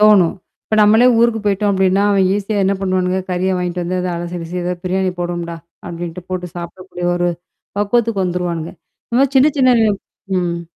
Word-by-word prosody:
தோணும். 210 -5 +5 0.3
இப்ப 215 - -1
நம்மளே 220 +4 +6
ஊருக்கு 230 -1 +3
போய்ட்டோம் 205 0 +1
அப்டின்னா, 190 0 +2
அவன் 195 -2 +3
ஈஸியா 205 +1 -1
என்னா 195 +1 +2
பண்ணுவானுங்க? 185 0 0
கறிய 180 +1 0
வாங்கிட்டு 180 0 -2
வந்து 185 +2 -2
அத 180 - -2
அலசி, 175 +1 -5
கிலசி 165 +2 -6
"ஏதாவாது 175 0 -3
பிரியாணி 185 +1 0
போடுவம்டா!"அப்டின்ட்டு 170 0 -6
போட்டு 180 -1 -3
சாப்பிடக்கூடிய 175 +1 -6
ஒரு 175 0 +1 0.5
பக்குவத்துக்கு 210 -1 +1
வந்துருவானுங்க. 175 -2 -2 0.4
இதுமாரி 260 +3 +2
சின்ன 265 +3 +6
சின்ன 255 -1 +5
வி 220 - +4 0.5
ம், 170 -1 -1
185 Hz, 160 wpm, -18 LUFS, 175-205 Hz, 0.5 s, நம்மளே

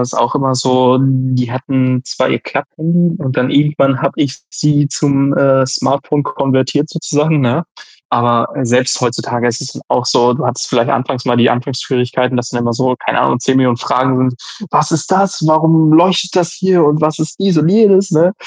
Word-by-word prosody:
es 125 0 -3
auch 120 +4 0
immer 135 -2 0
so, 130 0 +2
die 130 -2 0
hatten 130 -1 -1
2 - - -1
Klapphandy 170 +2 -2
und 130 -5 -4
dann 125 +1 0
irgendwann 140 -2 +1
habe 140 - -1
ich 140 -1 -2
sie 145 -1 0
zum, 140 -2 0
äh, 135 -1 +3
Smartphone 140 +2 -1
konvertiert 135 +3 -1
sozusagen, 155 -1 -1
ne? 125 +6 0 0.5
Aber, 120 -1 +1
äh, 135 - -3
selbst 125 +2 0
heutzutage 120 0 -2
ist 120 0 -3
es 135 - -8
auch 125 - 0
so, 120 0 +2
du - - -4
hattest 125 +1 -3
vielleicht 120 -2 0
anfangs 125 0 -2
mal 120 -2 0
die 120 0 +4
Anfangsschwierigkeiten, 125 0 -2
dass 125 0 -3
dann 120 - -3
immer 120 0 -1
so, 130 +2 0
keine - - 0
Ahnung, 120 - 0
10.000.000 130 -2 +1
Fragen 130 +1 0
sind. - - -9 0.4
„Was 150 - +1
ist 160 +1 -2
das? 195 -1 +1
Warum 160 0 +3
leuchtet 180 +2 +3
das 175 -1 +1
hier 185 -3 +2
und 150 +1 +2
was 155 0 0
ist 155 +4 -5
dies 195 -4 +1
und 155 +1 +2
jenes?”, 200 -1 +4
ne? 165 +4 +3
135 Hz, 190 wpm, -14 LUFS, 125-155 Hz, 0.5 s, die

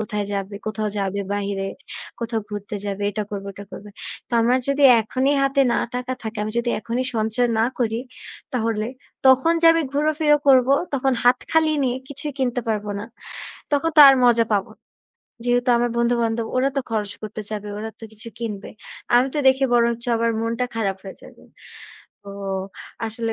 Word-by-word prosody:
কোথায় 210 -1 -2
যাবে, 200 +1 -4
কোথাও 215 0 -2
যাবে 195 0 -1
বাহিরে, 200 -1 -2 0.5
কোথাও 230 -1 -2
ঘুরতে 205 0 -5
যাবে, 200 0 -4
এটা 210 +1 -3
করবো 200 -1 -5
ওটা 200 - -9
করবে। 210 - -10 0.4
তো - - -25
আমার 245 +2 +3
যদি 280 +1 +1 0.2
এখনই 260 +6 0
হাতে 275 0 +3
না - - +1 0.2
টাকা 250 +1 -3
থাকে, 220 0 -6
আমি 215 - -3
যদি 240 0 0
এখনই 235 +4 -2
সঞ্চয় 225 +3 +1
না 225 - +4
করি। 230 -2 0 0.5
তাহলে 225 -3 -1 0.4
তখন 265 +5 +5
যে 335 - +5
আমি 330 0 +1
ঘুরা-ফিরা 300 +1 +2
করব, 260 -2 +6 0.3
তখন 270 0 +1
হাত 250 +1 +5
খালি 320 -1 +3
নিয়ে 250 -1 0
কিছুই 285 +1 -6
কিনতে 250 -2 0
পারব 210 -1 -1
না। 205 - -5 0.7
তখন 290 +3 +2
তো 305 - +6
আর 270 - +7
মজা 230 -2 +4
পাবো 200 -2 0
না। - - -56 0.6
যেহেতু 245 0 +2
আমার 240 0 +1
বন্ধু-বান্ধব 235 -1 +1
ওরা 265 +2 +3
তো 275 - +3
খরচ 210 -2 -2
করতে 215 0 -6
চাবে, 210 -1 -5
ওরা 220 +1 -5
তো - - -8
কিছু 220 +2 -10
কিনবে। 210 -4 -5 0.4
আমি 250 +2 +5
তো - - 0
দেখে 265 +1 +3
বরঞ্চ 235 0 +2
আবার 230 0 +1
মনটা 230 +2 -1
খারাপ 200 -4 -1
হয়ে 190 - -9
যাবে। - - -15 0.8
তো 200 - -13 0.8
আসলে 225 0 -3
230 Hz, 180 wpm, -22 LUFS, 210-255 Hz, 0.8 s, আর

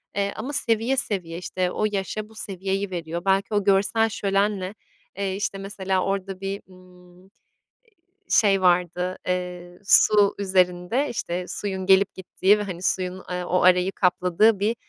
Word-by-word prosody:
eee, 200 0 -1
ama 255 +7 -5
seviye, 230 +1 +1
seviye, 175 -8 -2
işte, 180 0 -2
o 215 - -1
yaşa 210 +2 -3
bu 220 - -18
seviyeyi 195 0 -3
veriyor. 170 0 -5
Belki 195 +2 +1
o 205 -1 +2
görsel 200 +3 +2
şölenle, 200 -1 -1 0.4
eee, 195 -1 -2
işte, 200 0 -3
mesela 195 -1 -2
orada 195 -1 -3
bir, 195 +1 -4
ımm, 180 -1 -19
eee, 190 - -22 1.0
şey 195 -3 +4
vardı, 180 0 +1
eee, 180 -1 -4
su 205 0 +5
üzerinde, 185 +6 +1
işte, 180 -5 -3
suyun 190 -2 -4
gelip 195 0 +4
gittiği 190 +2 +2
ve, - - -2
hani, 180 -4 -6
suyun, 185 0 -1
eee, 180 0 -3
o 180 +1 +1
arayı 180 +1 +4
kapladığı 185 +3 +2
bir, 215 +3 +1
190 Hz, 155 wpm, -24 LUFS, 180-200 Hz, 1.0 s, su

